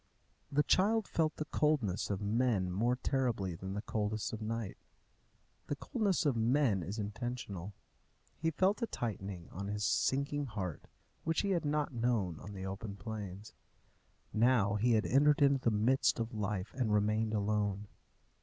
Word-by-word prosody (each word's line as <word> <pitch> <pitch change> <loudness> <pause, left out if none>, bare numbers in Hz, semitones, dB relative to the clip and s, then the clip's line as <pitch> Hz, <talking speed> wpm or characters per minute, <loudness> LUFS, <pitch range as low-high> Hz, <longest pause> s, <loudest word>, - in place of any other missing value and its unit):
The 145 +1 +3
child 215 +6 +3
felt 155 -2 +1
the 155 - -3
coldness 145 - +1
of 100 -1 -2
men 105 -4 +1
more 115 +7 +1
terribly 125 -8 0
than 95 +3 -6
the 105 - -3
coldness 110 0 -2
of 110 - -5
night. 110 -2 -3 0.9
The 145 - -1
coldness 205 - 0
of 140 -4 +3
men 115 -3 +2
is 95 +6 -5
intentional. 105 -3 -4 0.6
He 160 +1 0
felt 190 +8 +2
a 230 - +1
tightening 95 - -4
on 100 +2 -5
his 105 +1 -1
sinking 140 +4 +1
heart 95 - -5 0.4
which 165 0 +1
he 200 - 0
had 170 -4 +1
not 150 -1 0
known 115 -8 0
on 100 +3 -9
the 95 -1 -6
open 100 +2 -5
plains. 105 -2 -7 0.8
Now 110 -3 +4
he 115 +4 +3
had 110 -1 +3
entered 145 +3 +4
into 140 -1 +5
the 120 - +2
midst 115 +5 +2
of 115 +1 -2
life, 105 -2 -2
and 125 -5 0
remained 105 +1 +2
alone. 105 -1 0
110 Hz, 160 wpm, -34 LUFS, 100-140 Hz, 0.9 s, into